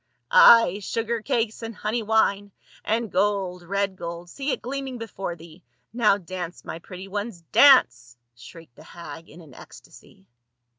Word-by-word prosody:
"Ay! 230 - +7
sugar 230 +3 -3
cakes 225 0 -2
and 225 -1 -7
honey 215 +3 -2
wine 205 -2 +1 0.2
— - - -25
and 225 -1 -2
gold, 190 -2 -1
red 200 +2 -2
gold, 170 0 -8
see 275 +1 -5
it - - -1
gleaming 270 0 -5
before 195 -6 -6
thee! 170 +1 -16 0.3
Now 220 -4 +3
dance 180 -2 -8
my 165 - -7
pretty 185 +2 -10
ones, 205 -2 -5
dance 125 - +5
!" 120 - -54
shrieked 125 +3 -15
the - - -14
hag 165 -1 -11
in 170 +4 -14
an 150 -5 -16
ecstacy. 95 - -16
195 Hz, 160 wpm, -24 LUFS, 170-230 Hz, 0.3 s, Ay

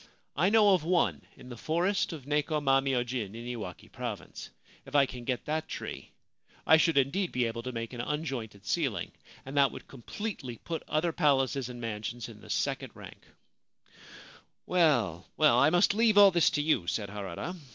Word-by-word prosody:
I 175 +7 +3
know 210 -2 +5
of 180 -5 +2
one 175 +1 +1 0.2
in 125 - -13
the 120 - -7
forest 175 - 0
of 150 -6 -8
Neko 150 +1 0
ma 135 -2 +3
myojin, 125 -5 -2
in 115 +1 -8
Iwaki 110 -8 -6
Province. - - -6 0.3
If - - -10
I 140 -1 +6
can 125 -2 -9
get 125 -1 -2
that 155 +1 -2
tree, - - -7 0.6
I 160 - +7
should 165 -1 +2
indeed 150 +8 +1
be 125 -1 0
able 115 0 -3
to 125 +2 -5
make 115 0 -5
an 120 - -4
unjointed 120 -8 -4
ceiling, 130 - -1 0.3
and 135 +2 -8
that 140 -1 +4
would - - -10
completely 135 - -6
put 165 +5 -5
other 160 +3 0
palaces 135 -4 +1
and 120 -1 -8
mansions 115 +1 -5
in 110 -3 -13
the - - -14
second - - -2
rank/ - - -13 0.7
' - - -20
Well, 120 - +2
well, 150 -6 +5
I 140 - +5
must 175 +4 +3
leave 220 -1 +3
all 200 -1 +9
this 170 -2 +4
to 145 - -1
you/ 150 - +1
said 100 +2 -2
Harada. 100 - -5
135 Hz, 185 wpm, -29 LUFS, 120-160 Hz, 0.7 s, all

